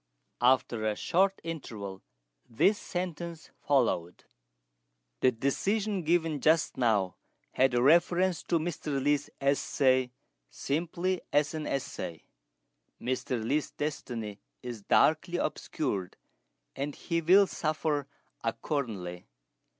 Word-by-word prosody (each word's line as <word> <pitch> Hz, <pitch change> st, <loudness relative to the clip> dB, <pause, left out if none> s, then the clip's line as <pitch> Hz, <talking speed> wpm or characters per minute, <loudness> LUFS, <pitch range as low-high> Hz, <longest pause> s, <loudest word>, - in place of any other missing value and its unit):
After 120 Hz, -2 st, +3 dB
a 110 Hz, -1 st, +1 dB
short 195 Hz, -, +2 dB
interval 110 Hz, -, -6 dB, 0.5 s
this 200 Hz, -, +3 dB
sentence 170 Hz, -2 st, -5 dB
followed: 115 Hz, -11 st, +1 dB, 1.0 s
"The 130 Hz, -, +4 dB
decision 195 Hz, -, 0 dB
given 165 Hz, -3 st, +1 dB
just 160 Hz, +1 st, +3 dB
now 105 Hz, -8 st, +1 dB, 0.3 s
had 130 Hz, -1 st, +3 dB
reference 175 Hz, +7 st, +4 dB
to 170 Hz, -, +2 dB
Mr. 155 Hz, -3 st, -2 dB
Li's 145 Hz, +1 st, +1 dB
essay 130 Hz, -2 st, +2 dB, 0.4 s
simply 175 Hz, +4 st, -1 dB
as 145 Hz, +2 st, +2 dB
an 155 Hz, -1 st, -3 dB
essay. 85 Hz, -, -4 dB, 0.8 s
Mr. 125 Hz, -1 st, -2 dB
Li's 145 Hz, +5 st, 0 dB
destiny 120 Hz, -8 st, -4 dB, 0.2 s
is 120 Hz, -3 st, -6 dB
darkly 160 Hz, -, +3 dB
obscured, 115 Hz, -, -2 dB, 0.6 s
and 140 Hz, +1 st, -3 dB
he 170 Hz, 0 st, -1 dB
will 190 Hz, +5 st, +6 dB
suffer 155 Hz, -4 st, -1 dB, 0.4 s
accordingly. 110 Hz, -, -3 dB
145 Hz, 100 wpm, -30 LUFS, 120-165 Hz, 1.0 s, will